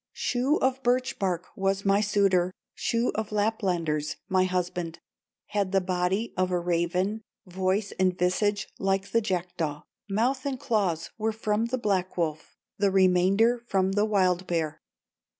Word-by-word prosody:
Shoe 260 +4 +1
of 265 0 +1
birch 250 +1 +1
bark 180 -3 -1
was 195 +1 0
my 200 +1 +4
suitor, 195 -4 +2 0.2
Shoe 235 +1 0
of 220 0 -3
Laplanders, 180 -8 0
my 185 -2 +3
husband; 180 -2 -2 0.5
Had 200 -2 0
the 195 - +5
body 185 +4 -1
of 185 0 +1
a 180 - +1
raven, 180 +5 0 0.2
Voice 190 +2 -1
and 185 -1 +2
visage 205 +3 +1
like 195 0 0
the 230 - +3
jackdaw, 175 -6 -2 0.3
Mouth 250 +6 +1
and 275 -3 -3
claws 175 -9 0
were 220 +1 +1
from 220 0 0
the 255 +2 -1
black 190 -6 -1
wolf, 160 -2 -2 0.2
The 200 0 +3
remainder 195 +5 +3
from 190 -2 +1
the 205 +2 +2
wild 185 -4 +1
bear. 160 -3 -1
195 Hz, 150 wpm, -27 LUFS, 180-215 Hz, 0.5 s, the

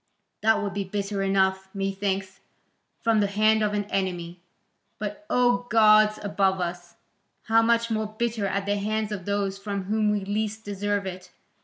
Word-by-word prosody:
That 220 0 +4
would 200 - -3
be 200 - -2
bitter 200 +1 -3
enough, 190 0 +1
methinks, 195 -1 -2 0.6
from 225 -1 +3
the 205 - +2
hand 215 +2 +3
of 210 -1 +1
an 205 - 0
enemy, 175 -2 -2 0.6
but 210 +9 -6
O 245 0 +2
gods 215 -1 +5
above 195 -2 +1
us! 175 0 -5 0.5
how 225 +1 +4
much 230 0 +2
more 220 -1 0
bitter 220 -1 -2
at 195 +1 -2
the 205 0 0
hands 215 +1 -2
of 190 -4 -5
those 200 -1 -1
from 200 -1 -4
whom 210 +2 +1
we 205 -2 0
least 215 +2 -2
deserve 205 0 -2
it! 185 -1 -7
205 Hz, 165 wpm, -26 LUFS, 195-215 Hz, 0.6 s, gods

